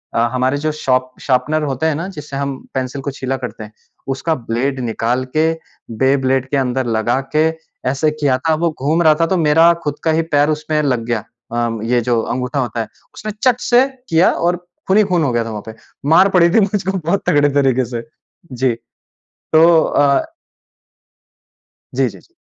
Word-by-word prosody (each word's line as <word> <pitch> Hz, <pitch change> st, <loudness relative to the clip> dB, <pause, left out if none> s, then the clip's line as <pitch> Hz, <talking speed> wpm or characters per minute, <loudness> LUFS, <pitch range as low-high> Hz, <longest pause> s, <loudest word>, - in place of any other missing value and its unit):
अ, -, -, +2 dB
हमारे 130 Hz, +2 st, +1 dB
जो 155 Hz, +2 st, -1 dB
sharp 130 Hz, -4 st, 0 dB
sharpener 150 Hz, +4 st, +1 dB
होते 140 Hz, 0 st, -2 dB
हैं 160 Hz, -2 st, +2 dB
ना 170 Hz, +5 st, -4 dB
जिससे 150 Hz, -2 st, -7 dB
हम 140 Hz, -1 st, -2 dB, 0.2 s
पेंसिल 130 Hz, +1 st, -3 dB
को 140 Hz, -, -3 dB
छीला 130 Hz, 0 st, -3 dB
करते 125 Hz, -3 st, -7 dB
हैं? 105 Hz, -, -11 dB, 0.4 s
उसका 135 Hz, +5 st, -1 dB
ब्लेड 125 Hz, +2 st, -2 dB
निकाल 120 Hz, +2 st, -1 dB
के, 160 Hz, +1 st, +3 dB, 0.5 s
बेब्लेड 130 Hz, 0 st, +2 dB
के 140 Hz, -, 0 dB
अंदर 130 Hz, -1 st, 0 dB
लगा 115 Hz, +2 st, 0 dB, 0.2 s
के 155 Hz, +1 st, +4 dB, 0.4 s
ऐसे 140 Hz, +4 st, +1 dB
किया 145 Hz, -4 st, +1 dB
था, 160 Hz, +5 st, 0 dB
वो 170 Hz, +1 st, 0 dB
घूम 155 Hz, +6 st, +1 dB
रहा 155 Hz, -1 st, +5 dB
था -, -, +5 dB
तो 190 Hz, -, +1 dB
मेरा 165 Hz, +1 st, +5 dB
खुद 145 Hz, 0 st, -3 dB
का 160 Hz, -, +2 dB
ही 160 Hz, +1 st, +2 dB
पैर 145 Hz, +1 st, +4 dB
उसमें 155 Hz, 0 st, -1 dB
लग 125 Hz, -5 st, 0 dB
गया। 120 Hz, -1 st, 0 dB, 0.3 s
अ, 120 Hz, -1 st, -1 dB
ये 120 Hz, +1 st, +1 dB
जो 120 Hz, 0 st, +1 dB
अंगूठा 125 Hz, +4 st, -2 dB
होता 120 Hz, -3 st, -2 dB
है। 110 Hz, -, -5 dB, 0.3 s
उसने 215 Hz, -, -6 dB
चट 250 Hz, -2 st, +3 dB
से 250 Hz, +2 st, +4 dB, 0.2 s
किया 165 Hz, +2 st, +4 dB
और 175 Hz, +1 st, 0 dB, 0.3 s
खून 190 Hz, -, +3 dB
ही 215 Hz, -, +6 dB
खून 175 Hz, -3 st, +2 dB
हो 140 Hz, -, +1 dB
गया 120 Hz, 0 st, +1 dB
था -, -, -5 dB
वहाँ 105 Hz, -2 st, -6 dB
पे। 110 Hz, -, -8 dB, 0.4 s
मार 195 Hz, -, +6 dB
पड़ी 175 Hz, -3 st, +4 dB
थी 205 Hz, -, +4 dB
मुझको 195 Hz, -1 st, 0 dB
बहुत 170 Hz, +4 st, -1 dB
तगड़े 145 Hz, 0 st, +4 dB
तरीके 130 Hz, -2 st, +2 dB
से। 120 Hz, 0 st, -5 dB, 0.5 s
जी। 125 Hz, 0 st, +1 dB, 0.8 s
तो 160 Hz, +1 st, +7 dB, 0.2 s
अ 145 Hz, -, +2 dB, 1.7 s
जी, -, -, +2 dB
जी, -, -, -13 dB
जी। 350 Hz, -, -26 dB
140 Hz, 195 wpm, -17 LUFS, 125-160 Hz, 1.7 s, तो